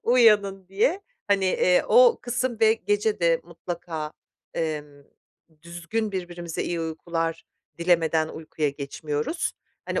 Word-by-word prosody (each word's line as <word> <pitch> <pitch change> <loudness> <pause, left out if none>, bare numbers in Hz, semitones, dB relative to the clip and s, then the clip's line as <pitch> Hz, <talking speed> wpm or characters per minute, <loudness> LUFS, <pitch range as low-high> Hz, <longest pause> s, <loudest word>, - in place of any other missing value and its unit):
uyanın 210 -6 +4
diye. 250 - +1 0.3
Hani, 200 -1 +3
eee, 180 -1 +3
o 485 -1 +6
kısım 245 -1 -2
ve 220 0 +6
gece 205 -1 0
de 165 -1 +3
mutlaka, 165 -2 -6 0.4
emm, 150 -3 -4 0.6
düzgün 175 +6 -3
birbirimize 175 -2 -4
iyi 170 -1 -2
uykular 165 0 -3 0.3
dilemeden 165 -2 +2
uykuya 155 -1 -3
geçmiyoruz. 150 - -3 0.3
Hani, - - -1
175 Hz, 115 wpm, -25 LUFS, 160-210 Hz, 0.6 s, o